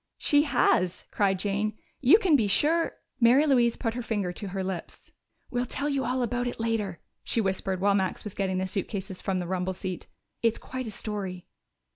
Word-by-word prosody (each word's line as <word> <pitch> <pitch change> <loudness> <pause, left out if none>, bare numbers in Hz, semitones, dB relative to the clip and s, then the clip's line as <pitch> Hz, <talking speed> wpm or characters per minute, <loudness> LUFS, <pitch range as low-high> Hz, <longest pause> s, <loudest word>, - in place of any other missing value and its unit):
"She 290 +1 +3
has!" 180 - +2
cried 195 -2 +2
Jane. 205 +2 -1 0.2
"You 275 +9 +7
can 370 -8 +3
be 225 -7 +3
sure 320 +11 +2
" - - -51
Mary 250 +6 +6
Louise 245 -5 +3
put 225 -3 -1
her 245 - -3
finger 205 -6 -2
to 205 - -6
her 190 0 -3
lips. 185 -2 -6 0.4
"We'll 245 0 -1
tell 285 +5 -2
you 275 -2 0
all 250 +1 0
about 245 +1 -1
it 240 - -5
later," 220 -6 -1 0.2
she - - 0
whispered 190 -2 -1
while 200 +1 +3
Max 190 -2 0
was 210 - -6
getting 190 -2 -1
the 185 - 0
suitcases 190 0 -4
from 190 -1 -1
the 180 - -2
rumble 185 +1 -2
seat. 185 -1 -5 0.3
"It's 230 -1 +2
quite 255 -2 -6
a - - -3
story." 200 -4 -4
210 Hz, 200 wpm, -27 LUFS, 190-245 Hz, 0.4 s, You